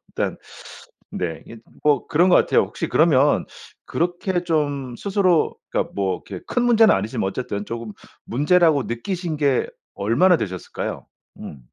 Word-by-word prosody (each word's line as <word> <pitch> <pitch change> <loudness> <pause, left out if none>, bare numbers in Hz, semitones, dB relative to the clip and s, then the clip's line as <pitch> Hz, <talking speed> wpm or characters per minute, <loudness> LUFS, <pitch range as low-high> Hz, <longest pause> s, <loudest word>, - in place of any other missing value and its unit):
일단 - - -2 0.7
네. 85 -3 -4
이게 115 - -11
좀 110 - -17 0.2
뭐 150 -1 +2
그런 170 +4 +3
거 - - +7
같아요. - - +3
혹시 - - -4
그러면 - - +3 0.4
그렇게 175 +1 -1
좀 145 -6 -1
스스로 190 -5 +1
그니까 - - -1
뭐 95 -2 -2
그렇게 95 -3 -8
큰 245 - 0
문제는 230 -2 +5
아니지만 105 +3 -2
뭐 95 - 0
어쨌든 105 -3 -4
쪼금 115 -2 -6 0.3
문제라고 150 +2 +3
느끼신 170 +7 -4
게 140 -3 +1 0.3
얼마나 120 - +3
되셨을까요? 95 -2 -5 0.3
음. 70 - -9
145 Hz, 320 characters per minute, -22 LUFS, 110-175 Hz, 0.7 s, 거